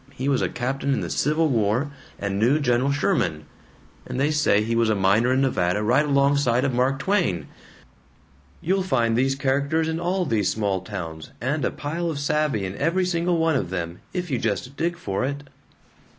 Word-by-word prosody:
He 130 +2 -3
was 140 -2 +2
a - - 0
captain 135 +2 -1
in - - -2
the - - -4
Civil 155 +3 +1
War, 120 +4 +1 0.3
and 100 0 -2
knew 125 +8 +3
General 125 0 +2
Sherman, 95 - 0 0.6
and - - -4
they 145 +3 +2
say 150 -9 +3
he 115 +1 -1
was 115 -1 +2
a 110 - +2
miner 100 +5 +3
in 130 +1 +2
Nevada 105 -6 +1
right 125 +7 +3
alongside 140 -3 +2
of 135 - 0
Mark 130 +2 +1
Twain. 150 - 0 1.2
You'll 190 +3 +1
find 120 -11 +1
these 135 +3 +2
characters 140 +4 0
in 160 0 -2
all 180 +2 0
these 105 - +1
small 100 -2 -1
towns, 85 -6 -7
and 140 +5 -1
a - - +2
pile 165 +4 -3
of 155 - -3
savvy 145 -7 0
in 95 +1 -5
every 170 +5 +1
single 175 -1 0
one 160 -1 +2
of 90 - -1
them, 85 -2 -4
if 180 -3 -4
you 125 - 0
just 115 +5 -2
dig 170 +3 -1
for 100 - -3
it." 140 +2 -3
135 Hz, 195 wpm, -24 LUFS, 110-150 Hz, 1.2 s, knew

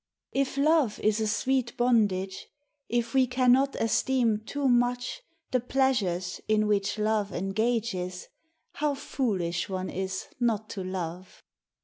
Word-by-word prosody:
[If 275 0 -1
love 290 -6 +3
is 215 +1 +2
a 220 - +1
sweet 255 +2 0
bondage, 205 -6 +1 0.4
If 235 -1 -1
we 260 -1 +4
cannot 255 +2 +3
esteem 230 -1 +1
too 275 +6 -2
much 245 - +1 0.3
The 255 - +3
pleasures 225 -9 0
in 215 0 +3
which 205 0 +1
love 215 -1 0
engages, 195 -2 -1 0.4
How 295 -1 -1
foolish 190 -12 -2
one 185 -1 -3
is 190 0 -3
not 220 -3 0
to 195 - -4
love! 185 -1 -6
220 Hz, 125 wpm, -28 LUFS, 190-250 Hz, 0.4 s, we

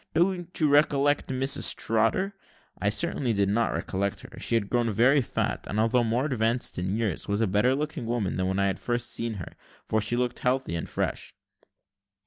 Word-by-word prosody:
don't 175 +1 0
you 155 - +4
recollect 145 0 +3
Mrs 130 +1 +1
Trotter?" 115 - +1 0.5
I 100 +3 +1
certainly 130 -1 0
did 100 -1 +1
not 115 +3 +1
recollect 100 +1 -2
her; - - -12
she 115 - 0
had 105 -3 +1
grown 120 +1 +1
very 125 +7 +4
fat, 120 - -3
and, 105 - -2
although 115 +2 +3
more 120 +4 0
advanced 120 -6 0
in 95 +4 -1
years, 110 -7 -2
was 100 0 0
a 115 - +3
better 105 +7 +2
looking 145 -5 -3
woman 115 -5 -1
than 95 0 0
when 95 +1 -1
I 100 - +2
had 95 -1 -1
first 120 0 -1
seen 115 -1 -3
her, 90 - -8 0.3
for 110 - +1
she 120 +3 0
looked 125 -1 -1
healthy 125 -7 0
and 85 - -3
fresh. - - -3
115 Hz, 195 wpm, -27 LUFS, 105-135 Hz, 0.5 s, you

